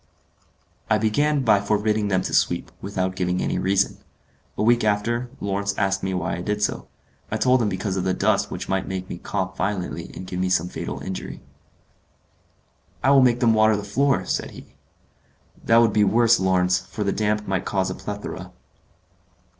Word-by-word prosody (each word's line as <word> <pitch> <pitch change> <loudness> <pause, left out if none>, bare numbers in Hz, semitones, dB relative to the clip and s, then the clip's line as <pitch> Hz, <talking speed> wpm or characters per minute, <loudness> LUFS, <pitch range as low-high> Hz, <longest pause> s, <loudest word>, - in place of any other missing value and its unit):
I 110 - +4
began 140 +7 +1
by 105 -4 +4
forbidding 105 +1 0
them 95 -2 +1
to - - -4
sweep, - - +1
without 95 -2 -2
giving 90 -1 -1
any - - -1
reason. 95 +1 +1 0.6
A - - 0
week 120 +1 +4
after, 115 +4 0
Lawrence 100 0 -2
asked 95 -1 0
me 95 - -2
why 85 -3 -2
I - - -5
did 105 +2 -2
so. - - -2 0.4
I 110 - -1
told 125 +3 +3
him 110 - +1
because 95 0 -3
of 95 - -1
the 95 0 0
dust - - +1
which - - -6
might 95 0 -1
make 95 -1 -4
me 85 - -6
cough 95 -1 -3
violently 95 -1 -3
and 95 - -7
give 90 0 -5
me 95 0 0
some 90 -1 +1
fatal - - -5
injury. 95 0 -6 1.6
"I 135 - +4
will 140 -1 +7
make 125 -1 +3
them 115 -2 +4
water 110 -1 +4
the 105 - -5
floor," 135 +7 +1
said - - -2
he. - - -13 0.9
"That 115 - +4
would 115 -3 +4
be 105 - +4
worse, 115 +3 +4
Lawrence, 90 -1 +2
for 105 +4 -5
the 100 - 0
damp 105 0 -1
might 95 -1 -1
cause 95 -1 0
a - - -3
plethora." 95 -3 -7
100 Hz, 185 wpm, -23 LUFS, 95-110 Hz, 1.6 s, will